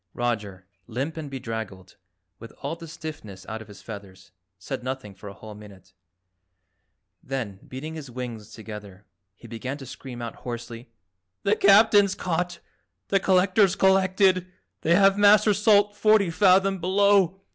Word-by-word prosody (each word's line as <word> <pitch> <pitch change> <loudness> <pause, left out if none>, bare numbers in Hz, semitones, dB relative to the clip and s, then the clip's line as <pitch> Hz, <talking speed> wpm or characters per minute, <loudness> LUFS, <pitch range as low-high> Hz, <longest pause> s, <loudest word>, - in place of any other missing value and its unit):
Roger, 105 -6 -3 0.2
limp 130 +7 -4
and 155 -3 -6
bedraggled, 110 -8 -7 0.4
with 115 0 -11
all 145 +4 -3
the 165 0 -11
stiffness 155 - -9
out 110 0 -6
of 110 - -12
his 105 - -14
feathers, 100 -4 -11 0.3
said 125 +8 -6
nothing 130 -5 -5
for 100 +1 -11
a - - -10
whole 110 +2 -11
minute. 100 -3 -15 1.3
Then, 120 -8 -5
beating 145 +5 -7
his 155 -4 -8
wings 120 -4 -7
together, 105 -3 -10 0.3
he - - -14
began 130 +4 -5
to 135 - -10
scream 125 -1 -9
out 115 -1 -6
hoarsely, 120 0 -8 0.5
"The 200 +1 +2
Captain's 205 -1 +5
caught! 175 0 -2 0.5
The 195 - +3
Collector's 190 +1 +3
collected. 190 -1 +3 0.3
They 170 +2 +3
have 195 +1 +4
Master 210 +1 +6
Salt 205 0 +3
forty 215 -4 +3
fathom 195 +1 +3
below. 190 0 +3
140 Hz, 145 wpm, -25 LUFS, -, 1.3 s, Master